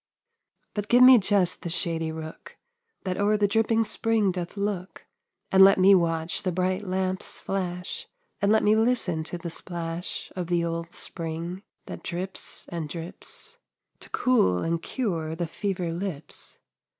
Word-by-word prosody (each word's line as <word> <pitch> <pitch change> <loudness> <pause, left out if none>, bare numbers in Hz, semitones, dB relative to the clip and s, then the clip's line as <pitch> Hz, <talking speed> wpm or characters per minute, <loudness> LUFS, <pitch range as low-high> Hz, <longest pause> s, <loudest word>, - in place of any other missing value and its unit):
But 205 -1 -3
give 245 +2 +6
me 255 -1 +10
just 195 -3 +2
the 170 - -4
shady 165 -1 -1
rook 160 0 -9 0.5
That 185 -1 -2
o'er 210 +1 +3
the 205 -1 +3
dripping 225 +2 +2
spring 220 -2 +1
doth 180 +2 -5
look, 200 -2 -3 0.5
And 190 0 +8
let 195 +1 +7
me 190 +1 +7
watch 165 -2 +2
the 185 - -1
bright 185 +2 0
lamps 185 -1 -2
flash, 190 - -4 0.3
And 200 +1 +3
let 220 - +4
me 210 +1 +5
listen 220 -8 +1
to 175 - -5
the 170 -1 -6
splash 170 0 -5
Of 180 -2 -3
the 170 -1 +1
old 170 0 -3
spring 170 +2 -3 0.2
that - - -7
drips 185 +2 -4
and 165 -3 -4
drips, 180 - -4 0.4
To - - -12
cool 160 - +2
and 165 0 0
cure 165 -11 -2
the 170 +1 -2
fever 180 0 -3
lips. 170 -4 -5
185 Hz, 155 wpm, -26 LUFS, 170-205 Hz, 0.5 s, me